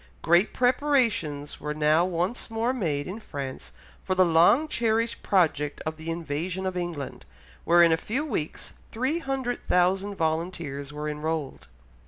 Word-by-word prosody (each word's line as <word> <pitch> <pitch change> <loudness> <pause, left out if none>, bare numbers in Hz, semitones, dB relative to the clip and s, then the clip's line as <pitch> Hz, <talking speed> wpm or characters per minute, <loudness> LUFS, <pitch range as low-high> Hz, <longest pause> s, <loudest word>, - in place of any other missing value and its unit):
Great 175 +4 +4
preparations 245 - +1
were 150 0 -4
now 155 +2 +3
once 180 +7 -2
more 225 +3 0
made 155 - -1
in 195 +5 -6
France 140 -10 -7 0.3
for 185 - -1
the 185 0 +5
long 180 - +5
cherished 230 -3 0
project 150 -6 +1
of 155 0 -2
the 160 +1 -7
invasion 170 +3 -3
of 185 -1 -2
England, 175 -6 -4 0.4
where 175 0 +6
in 170 - +5
a 160 - +4
few 255 - -2
weeks 185 - -4 0.2
300,000 240 - 0
volunteers 160 -4 -2
were 150 0 -5
enrolled. 150 -1 -3
175 Hz, 140 wpm, -26 LUFS, 155-225 Hz, 0.4 s, where